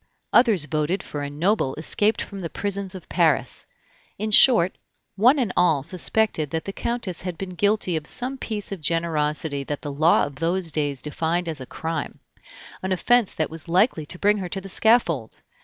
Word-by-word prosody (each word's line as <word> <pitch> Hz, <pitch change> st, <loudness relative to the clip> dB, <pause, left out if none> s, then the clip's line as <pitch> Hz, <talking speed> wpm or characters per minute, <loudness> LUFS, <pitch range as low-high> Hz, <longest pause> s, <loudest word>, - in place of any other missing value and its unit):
Others 225 Hz, -, +4 dB
voted 155 Hz, +4 st, -1 dB
for 145 Hz, -, -6 dB
a 145 Hz, -, -4 dB
noble 155 Hz, -1 st, 0 dB
escaped 205 Hz, +7 st, +1 dB
from 200 Hz, -, -9 dB
the 170 Hz, -3 st, -5 dB
prisons 200 Hz, 0 st, -3 dB
of 180 Hz, -, -10 dB
Paris. 155 Hz, -8 st, +1 dB, 0.5 s
In 215 Hz, +2 st, -3 dB
short, 210 Hz, -5 st, +6 dB, 0.4 s
one 245 Hz, +9 st, +5 dB
and 235 Hz, -8 st, -1 dB
all 160 Hz, -6 st, +3 dB
suspected 180 Hz, -1 st, 0 dB
that 160 Hz, +1 st, -3 dB
the 195 Hz, -, -5 dB
Countess 235 Hz, -8 st, -2 dB
had 180 Hz, -2 st, -5 dB
been 190 Hz, -1 st, -6 dB
guilty 200 Hz, -1 st, 0 dB
of 155 Hz, -1 st, -4 dB
some 260 Hz, +2 st, -3 dB
piece 210 Hz, -4 st, -4 dB
of 195 Hz, -4 st, -6 dB
generosity 155 Hz, -3 st, 0 dB
that 145 Hz, 0 st, -5 dB
the 145 Hz, -2 st, -4 dB
law 155 Hz, +4 st, +4 dB
of 140 Hz, -1 st, -9 dB
those 170 Hz, +2 st, -1 dB
days 145 Hz, -4 st, -2 dB
defined 165 Hz, +3 st, -2 dB
as 155 Hz, -4 st, -4 dB
a 130 Hz, -, -8 dB
crime, 160 Hz, +2 st, -5 dB, 0.6 s
an 190 Hz, -, -3 dB
offense 235 Hz, +4 st, +2 dB
that 155 Hz, -, -1 dB
was 165 Hz, +1 st, -4 dB
like 190 Hz, +8 st, +4 dB
to 155 Hz, +3 st, -5 dB
bring 205 Hz, +2 st, +2 dB
her 180 Hz, -2 st, -5 dB
to 195 Hz, -, -4 dB
the 195 Hz, -, -10 dB
scaffold. 180 Hz, -, +1 dB
175 Hz, 190 wpm, -23 LUFS, 155-200 Hz, 0.6 s, short